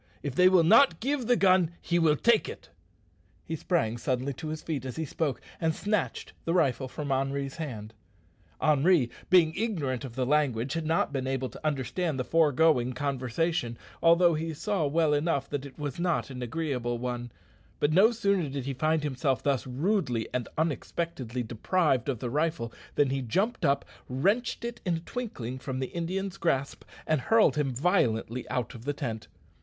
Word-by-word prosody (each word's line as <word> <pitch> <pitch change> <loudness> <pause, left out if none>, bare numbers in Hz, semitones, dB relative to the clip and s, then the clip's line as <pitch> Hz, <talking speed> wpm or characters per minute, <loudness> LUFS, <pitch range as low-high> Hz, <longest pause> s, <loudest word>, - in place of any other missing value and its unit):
If 145 - -3
they 180 +6 +6
will 185 -3 +5
not 215 0 +6
give 265 0 -1
the 245 - +5
gun 185 -5 +4
he 175 0 0
will 160 -3 +4
take 235 +6 +3
it." - - -10 0.8
He 160 - -3
sprang 140 -9 0
suddenly 130 +3 -1
to 160 +4 -7
his 155 0 -5
feet 150 -6 -3
as 130 -1 -5
he 160 - -2
spoke, 145 -2 -2 0.2
and 160 -1 0
snatched 210 0 -2
the 165 - 0
rifle 135 -6 +2
from 140 +2 -5
Henri's 135 +1 -1
hand. 110 -9 -6 0.7
Henri 150 -3 +3 0.2
being 170 -4 +5
ignorant 160 - -2
of 125 -4 -8
the 130 -1 0
language 135 -3 +1
had 165 -1 -2
not 160 -2 +1
been 130 -1 -2
able 130 -1 -1
to - - -13
understand 150 +2 -1
the - - +1
foregoing 150 -4 +3
conversation, 135 0 -1 0.2
although 170 +1 +5
he 160 +1 -3
saw 190 -2 0
well 155 +1 +2
enough 145 -2 0
that 145 -1 -3
it 135 - -16
was 145 0 -4
not 175 -5 0
an 125 -1 -7
agreeable 125 -2 -2
one; 120 0 -4 0.5
but 145 +1 +2
no 200 +7 +6
sooner 200 -8 +1
did 135 -2 -4
he 140 - -2
find 155 +3 +1
himself 135 -2 -1
thus 135 -3 0
rudely 130 - 0
and 125 -3 -1
unexpectedly 150 -5 -2
deprived 130 - 0
of 130 - -1
the 120 +1 -4
rifle 150 -5 -1 0.2
than 140 -2 +3
he 135 0 -1
jumped 195 - -1
up, 140 0 +2 0.2
wrenched 205 - 0
it 235 -1 -5
in 175 -2 0
a - - -3
twinkling 150 - -5
from 130 0 -4
the 130 - -4
Indian's 185 +3 -3
grasp, 140 -5 -1 0.2
and 155 -4 +1
hurled 225 - +4
him 145 -3 0
violently 125 - 0
out 125 -2 -2
of 120 -1 -11
the 145 - 0
tent. 115 -6 -5
145 Hz, 180 wpm, -28 LUFS, 130-170 Hz, 0.8 s, they